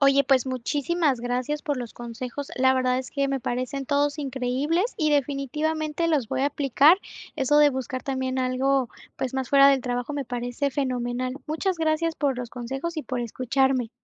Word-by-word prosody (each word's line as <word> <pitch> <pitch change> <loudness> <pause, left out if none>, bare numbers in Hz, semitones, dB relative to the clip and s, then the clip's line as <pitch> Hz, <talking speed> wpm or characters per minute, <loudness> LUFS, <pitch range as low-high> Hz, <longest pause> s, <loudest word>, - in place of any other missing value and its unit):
Oye, 275 0 +5
pues 265 -1 +3
muchísimas 280 +2 0
gracias 250 +5 -2
por 290 -2 -1
los 245 -3 -6
consejos. 245 +4 -6
La 260 0 +4
verdad 255 0 +1
es 260 -1 -6
que 280 -1 0
me 275 0 0
parecen 255 +2 -3
todos 290 +1 +1
increíbles 280 - -1
y 305 -2 +1
definitivamente 300 +3 0
los 295 -7 +1
voy - - -1
a 275 - +3
aplicar. 290 +5 +4 0.4
Eso 285 +3 +3
de 295 0 +7
buscar 255 -1 -4
también 260 -1 -2
algo, 260 0 +1 0.3
pues 260 0 -3
más 265 -1 -2
fuera 275 0 +7
del 270 -2 +3
trabajo 245 +3 -2
me 280 -2 -2
parece 245 +3 -2
fenomenal. 255 -2 -2
Muchas 335 +5 -1
gracias 320 0 0
por 275 -4 0
los 245 -2 -4
consejos 270 +7 -5
y 310 - -2
por 250 -1 -3
escucharme. 255 +1 0
270 Hz, 180 wpm, -25 LUFS, 255-290 Hz, 0.4 s, de